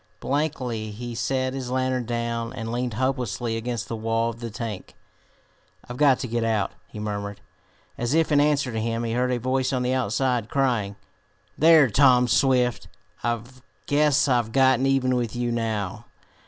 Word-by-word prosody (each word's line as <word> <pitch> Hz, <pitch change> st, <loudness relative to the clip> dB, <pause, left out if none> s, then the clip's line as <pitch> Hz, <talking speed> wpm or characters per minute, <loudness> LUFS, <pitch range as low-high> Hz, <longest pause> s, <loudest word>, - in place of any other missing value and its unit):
Blankly 130 Hz, -6 st, -2 dB
he 120 Hz, +3 st, -7 dB
set 130 Hz, +2 st, -1 dB
his 130 Hz, -2 st, -5 dB
lantern 130 Hz, -1 st, 0 dB
down 115 Hz, 0 st, -2 dB
and 115 Hz, -3 st, -5 dB
leaned 120 Hz, -1 st, -2 dB
hopelessly 120 Hz, -3 st, -1 dB
against 115 Hz, -1 st, -3 dB
the 115 Hz, -, -4 dB
wall 115 Hz, +1 st, 0 dB
of 115 Hz, -, -13 dB
the 120 Hz, -1 st, -5 dB
tank. 110 Hz, -3 st, -6 dB, 0.9 s
"I've 120 Hz, -, -7 dB
got 140 Hz, -3 st, +5 dB
to -, -, -3 dB
get 120 Hz, 0 st, -1 dB
out," 110 Hz, -3 st, 0 dB, 0.2 s
he -, -, -12 dB
murmured. 100 Hz, -1 st, -4 dB, 0.6 s
As 120 Hz, +5 st, 0 dB
if 160 Hz, -1 st, +2 dB
in 145 Hz, -, +5 dB
answer 145 Hz, -3 st, +1 dB
to 110 Hz, -1 st, -2 dB
him 115 Hz, +1 st, -2 dB
he 115 Hz, -, -2 dB
heard 125 Hz, +1 st, +1 dB
a 125 Hz, -, +1 dB
voice 130 Hz, +2 st, 0 dB
on 130 Hz, -2 st, 0 dB
the 125 Hz, +1 st, 0 dB
outside, 125 Hz, -1 st, 0 dB
crying: 120 Hz, -8 st, 0 dB, 0.6 s
"There, 160 Hz, -2 st, +6 dB
Tom 125 Hz, +1 st, +5 dB
Swift! 125 Hz, -1 st, +2 dB, 0.4 s
I 120 Hz, -1 st, 0 dB, 0.4 s
guess 150 Hz, 0 st, +3 dB
I've 120 Hz, -4 st, +1 dB
gotten 130 Hz, 0 st, +3 dB
even 130 Hz, -2 st, +2 dB
with 120 Hz, -2 st, -2 dB
you 120 Hz, 0 st, -1 dB
now! 110 Hz, -2 st, -3 dB
120 Hz, 170 wpm, -24 LUFS, 115-130 Hz, 0.9 s, There